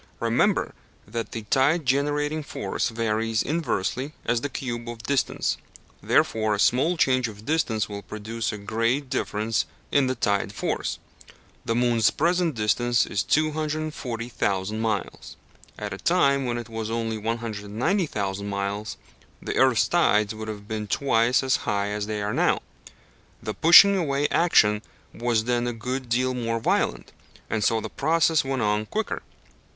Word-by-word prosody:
Remember - - +1 0.3
that 115 +2 -4
the 115 - -5
tide 140 +8 +2
generating 145 +3 +1
force 115 -6 -3
varies 115 -1 0
inversely 145 - -2
as 120 0 +1
the 145 - -2
cube 120 -3 -5
of 115 -1 -8
distance, 140 +2 0 0.4
wherefore 110 -1 +2
a - - -6
small 155 - +3
change 130 -4 +2
of 105 -1 -11
distance 135 -9 0
will 100 -1 -6
produce 110 +2 -4
a 105 - -5
great 115 +6 -1
difference 110 -3 -1 0.2
in 140 -2 +3
the 130 - -1
tide 100 -3 0
force. - - -2 0.7
The 115 - 0
moon's 120 -2 +3
present 170 -1 +1
distance 115 +2 +2
is 100 - -1
240 155 -6 -1
thousand 100 -1 -1
miles. 110 -4 -3 0.4
At - - -5
a - - -7
time 140 -1 +2
when 120 -1 -1
it 120 -1 -6
was 110 -1 -5
only 115 -1 -2
190 115 - -1
thousand 100 -3 -3
miles, 100 +1 -3 0.4
the - - -4
earth's 130 -4 +4
tides 105 -11 +2
would 110 0 -7
have 105 -1 -7
been 110 -1 -4
twice 120 +1 +2
as 130 -1 +2
high 100 -1 -1
as 105 0 -3
they 105 -1 -3
are 105 +1 -2
now. - - +2 0.8
The 110 - -3
pushing 195 - +8
away 145 -5 +1
action 105 -11 +4 0.3
was 115 -2 0
then 120 +1 0
a 120 - -2
good 125 +2 -4
deal 130 +2 +1
more 115 -2 -2
violent, 60 - 0 0.4
and 110 -2 0
so 115 +1 +2
the - - -5
process 160 +1 +2
went 135 -3 -1
on 105 +1 0
quicker. 220 0 -3
115 Hz, 155 wpm, -25 LUFS, 110-140 Hz, 0.8 s, pushing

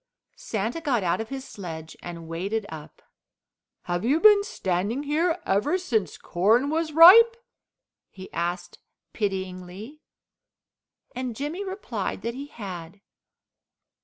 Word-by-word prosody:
Santa 225 +9 -3
got 255 -9 0
out 175 +4 0
of 225 - -7
his 270 -1 -6
sledge 160 -5 -8
and 170 -2 -8
waded 195 +6 -3
up. 155 -1 -11 0.8
"Have 175 0 -2
you 275 +7 +2
been 415 +1 +7
standing 200 - -2
here 325 +4 0
ever 210 - +1
since 230 - -1
corn 225 +11 +2
was 320 0 -1
ripe?" 415 +9 +9 0.7
he 190 0 -12
asked 175 +1 -3 0.3
pityingly, 190 +6 -5 1.1
and 250 -2 -4
Jimmy 300 - -4
replied 255 - -4
that 235 +1 -2
he 275 +3 -7
had. 190 - -9
220 Hz, 120 wpm, -25 LUFS, 180-295 Hz, 1.1 s, ripe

